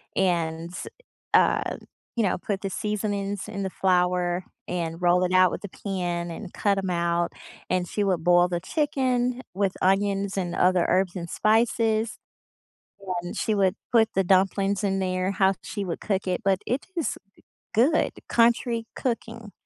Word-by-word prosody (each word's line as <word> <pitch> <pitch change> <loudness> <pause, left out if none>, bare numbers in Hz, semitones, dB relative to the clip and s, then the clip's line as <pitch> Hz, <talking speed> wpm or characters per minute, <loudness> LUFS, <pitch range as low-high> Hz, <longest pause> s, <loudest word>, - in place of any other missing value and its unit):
and, 170 -2 0 0.6
um - - +3 0.4
you 230 - +3
know, 190 - +1
put 195 +2 -3
the 195 - -2
seasonings 205 0 -2
in 200 -2 -4
the 190 - -2
flour 180 -1 +1 0.2
and 170 -1 -3
roll 180 +1 +4
it 180 - -2
out 185 -1 +6
with - - -5
a - - -7
pan 175 -3 -3
and 180 +2 -8
cut 200 -1 +1
'em 190 -1 -2
out, 170 -1 0 0.4
and 180 -2 0
she 205 - 0
would 180 -4 0
boil 175 0 +5
the 175 -1 -2
chicken 255 - 0
with 195 0 0
onions 195 +1 +1
and 180 -2 -2
other 180 -1 +3
herbs 185 -1 +1
and 170 -1 -6
spices, 225 +1 +2 1.1
and 175 - -6
she 220 - 0
would 195 -2 +2 0.2
put 225 -2 +4
the 195 - +3
dumplings 195 +2 +2
in 195 -1 +1
there 185 0 0
how 190 0 +3
she 205 -2 -4
would 170 - -4
cook 195 -2 -1
it 180 - 0
but 195 -1 +2
it 255 +4 -1
is, 330 - -1
uh, - - -14 0.5
good 265 +9 +3 0.2
country 235 0 +2
cooking 230 -3 -4
195 Hz, 165 wpm, -25 LUFS, 180-215 Hz, 1.1 s, out